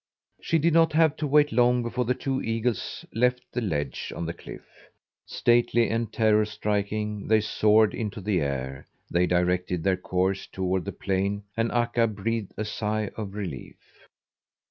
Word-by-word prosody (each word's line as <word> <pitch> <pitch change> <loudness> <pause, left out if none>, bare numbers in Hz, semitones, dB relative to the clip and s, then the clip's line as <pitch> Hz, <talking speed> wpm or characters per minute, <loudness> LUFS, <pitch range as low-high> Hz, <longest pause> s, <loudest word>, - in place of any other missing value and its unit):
She 165 - +1
did 165 +1 +2
not 165 -1 +4
have 160 -1 +4
to 150 - -2
wait 145 +1 +4
long 125 +1 +3
before 125 +1 -2
the 125 +2 +1
two 135 0 -2
eagles 115 0 -2
left 125 +2 +1
the 125 - -1
ledge 75 - -3
on 85 - -4
the 85 - -3
cliff. - - -11 0.6
Stately 120 0 +2
and 115 -1 -1
terror 110 -1 +3
striking 105 0 -2
they 110 0 +5
soared 110 0 +3
into 105 -2 -4
the 100 -2 0
air. 65 -2 -3 0.2
They 90 +1 +2
directed 90 -1 0
their 95 -1 +2
course 95 +1 -1
toward 95 -2 -2
the - - -3
plain, 100 +1 -1
and 115 0 0
Akka 120 -1 +2
breathed 110 0 -3
a 110 - -2
sigh 105 0 -2
of 100 -3 -6
relief. 90 -11 -6
105 Hz, 165 wpm, -26 LUFS, 95-120 Hz, 0.6 s, they